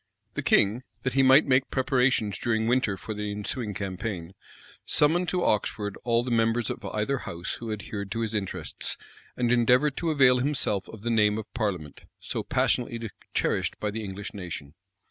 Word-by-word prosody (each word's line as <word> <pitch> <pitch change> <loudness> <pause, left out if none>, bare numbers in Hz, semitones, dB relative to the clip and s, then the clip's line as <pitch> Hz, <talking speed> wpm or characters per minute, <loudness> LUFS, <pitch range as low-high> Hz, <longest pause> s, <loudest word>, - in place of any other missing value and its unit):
The - - -2
king, 105 +4 +3 0.2
that 130 - -1
he 135 - +4
might 135 +3 +7
make 130 -1 +3
preparations 125 -5 +1
during 110 -2 0
winter 115 -4 +1
for 110 +5 -6
the 105 0 -3
ensuing 105 +1 -3
campaign, 95 -3 -4 0.5
summoned 175 +4 +3
to 180 -1 0
Oxford 105 -1 0
all 120 0 +2
the 125 - -4
members 115 0 +2
of - - -7
either 115 +6 -1
house 85 -5 -5
who 115 -2 -5
adhered 100 -1 -5
to 115 - -2
his 110 -1 -2
interests; 100 -3 -3 0.4
and 120 -1 +1
endeavored 125 +4 +4
to 170 - -1
avail 135 -4 +5
himself 125 -8 0
of 110 -2 -11
the 120 - 0
name 105 -2 +3
of 110 - -7
parliament, 95 - -3
so - - -3
passionately 115 -3 0 0.2
cherished - - 0
by 105 - -1
the 110 +1 -4
English 100 0 -6
nation. 85 -7 -7
115 Hz, 175 wpm, -27 LUFS, 105-125 Hz, 0.5 s, might